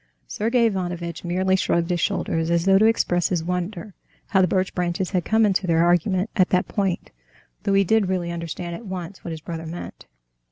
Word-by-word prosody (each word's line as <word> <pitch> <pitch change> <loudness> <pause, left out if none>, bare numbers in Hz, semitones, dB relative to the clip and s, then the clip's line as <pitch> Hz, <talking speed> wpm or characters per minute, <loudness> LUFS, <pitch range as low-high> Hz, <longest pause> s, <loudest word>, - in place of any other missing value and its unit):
Sergey 230 - +1
Ivanovitch 175 -5 -2
merely 185 +2 +1
shrugged 170 -2 0
his 175 - 0
shoulders, 165 0 -1
as 170 0 +1
though 195 0 +5
to 215 - +5
express 175 -6 +2
his 175 -4 0
wonder 180 +3 -4 0.4
how 190 -3 +4
the 185 - +4
birch 185 +1 0
branches 180 +1 -1
had 180 -3 0
come 220 0 +3
into 195 -2 +1
their 165 0 +3
argument 185 +3 +2
at 185 -2 +3
that 180 0 +1
point, 195 -4 -2 0.5
though 200 - +2
he 195 - +5
did 205 0 +2
really 175 -2 -1
understand 170 +1 -5
at 215 +5 -8
once 185 0 -6
what - - -5
his 160 -1 -6
brother 165 0 -6
meant. 170 +2 -8
180 Hz, 200 wpm, -23 LUFS, 170-195 Hz, 0.5 s, though